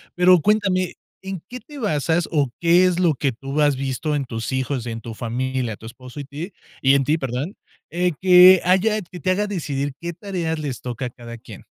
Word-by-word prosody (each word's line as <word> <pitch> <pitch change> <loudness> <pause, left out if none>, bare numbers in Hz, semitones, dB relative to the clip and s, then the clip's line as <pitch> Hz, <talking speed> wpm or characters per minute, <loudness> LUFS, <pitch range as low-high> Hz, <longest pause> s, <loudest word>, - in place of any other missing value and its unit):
Pero 180 0 +6
cuéntame, 195 -2 +1 0.3
¿en 190 -3 -5
qué 250 - -7
te 295 +2 -12
basas, 165 - 0
o 145 -5 +1
qué 175 +2 +5
es 180 -1 +1
lo 170 -5 +3
que 135 +1 0
tú 135 +5 -5
has 145 -2 +3
visto 135 +3 -2
en 140 -2 -1
tus 115 -2 -5
hijos, 130 -1 -2
y 120 - -4
en 115 0 -6
tu 115 0 -7
familia, 125 -1 -3
tu - - -14
esposo 125 +4 -11
y 140 - -6
ti 155 +8 -7 0.3
y 135 0 +5
en 140 - +3
ti, 155 +4 +2
perdón, 135 - -4 0.3
eh, 180 +3 0
que 185 0 +8
haya 200 +4 +2
que 180 -1 -11
te 185 +3 0
haga 205 +3 0
decidir 145 -8 -3
qué 170 0 -5
tareas 170 -4 -3
les 140 -5 -4
toca 125 +1 -4
a - - -3
cada 120 -1 -10
quien? - - -12
155 Hz, 220 wpm, -22 LUFS, 130-180 Hz, 0.3 s, que